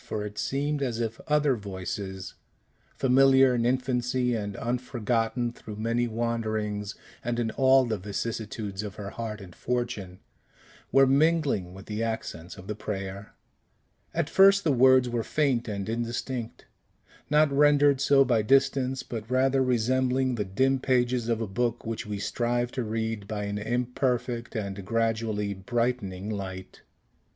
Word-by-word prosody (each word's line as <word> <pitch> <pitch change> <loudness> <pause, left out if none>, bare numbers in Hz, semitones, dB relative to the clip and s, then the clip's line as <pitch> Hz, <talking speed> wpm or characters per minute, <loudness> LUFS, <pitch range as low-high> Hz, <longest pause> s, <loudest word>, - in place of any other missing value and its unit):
For 105 -1 -4
it 105 0 -7
seemed 145 +2 -1
as 120 -4 -1
if 115 -1 -3
other 150 -3 +3
voices 95 -2 -6 0.6
familiar 135 0 +5
in 120 -1 +1
infancy, 125 0 0
and 100 -3 -3
unforgotten 120 -1 -1
through 110 -2 -9
many 115 +3 0
wanderings, 110 -3 -2 0.3
and 120 0 -2
in 115 -2 -1
all 130 +1 +4
the 110 -3 -2
vicissitudes 105 0 -4
of 105 -2 -6
her 100 -1 -6
heart 110 -2 -5
and 90 -3 -11
fortune 120 -7 -3 0.7
were 135 0 +6
mingling 140 - +2
with 95 - -11
the 105 +1 -4
accents 110 -7 -4
of 95 - -11
the 105 - -3
prayer. 100 -1 -6 0.8
At - - -1
first 195 +1 +6
the 155 - +2
words 130 0 +5
were 120 -1 -1
faint 130 -2 0
and 100 -2 -4
indistinct, 120 +1 -4 0.6
not 150 0 +4
rendered 145 -1 +4
so 140 -1 +5
by 120 -3 +2
distance, 135 +2 +2
but 110 -2 -6
rather 130 +1 +2
resembling 130 +1 +1
the 110 -3 -1
dim 130 +8 +1
pages 125 -2 +1
of 115 -1 0
a 110 - -2
book 120 +4 -2
which 115 -1 -4
we 105 -1 -3
strive 120 +3 -1
to 125 - -2
read 110 -2 -3
by 105 -1 -3
an 100 0 -3
imperfect 120 +1 -1
and 100 -2 -4
gradually 110 -1 -1
brightening 105 -2 -2
light. 95 -2 -6
115 Hz, 145 wpm, -27 LUFS, 105-130 Hz, 0.8 s, were